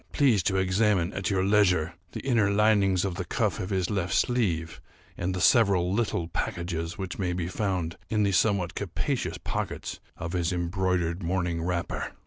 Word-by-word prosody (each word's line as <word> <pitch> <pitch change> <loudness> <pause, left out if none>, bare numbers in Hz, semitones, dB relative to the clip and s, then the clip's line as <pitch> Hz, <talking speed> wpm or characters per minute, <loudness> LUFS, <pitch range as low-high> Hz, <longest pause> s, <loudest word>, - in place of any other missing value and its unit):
Please 125 -9 +4
to 95 +2 0
examine, 95 -1 +2
at 95 -2 -2
your 95 -2 +1
leisure, 95 -5 +3 0.2
the - - -5
inner 115 -6 +3
linings 100 -3 +3
of 95 - -2
the - - -3
cuff - - -1
of 90 - -4
his 95 -2 0
left 95 -3 -1
sleeve, 90 -10 0 0.3
and 90 +1 -2
the - - -2
several 100 -6 +4
little 100 -6 0
packages 85 0 -3
which 95 -1 -5
may 90 -2 0
be 90 -1 -2
found 90 -4 -2
in 105 -1 +2
the 100 - +2
somewhat 95 -2 +2
capacious - - -2
pockets - - -4 0.2
of 85 +2 -5
his 85 -2 0
embroidered 90 0 -1
morning 85 -1 -1
wrapper." 85 -1 -2
95 Hz, 170 wpm, -27 LUFS, 85-100 Hz, 0.3 s, Please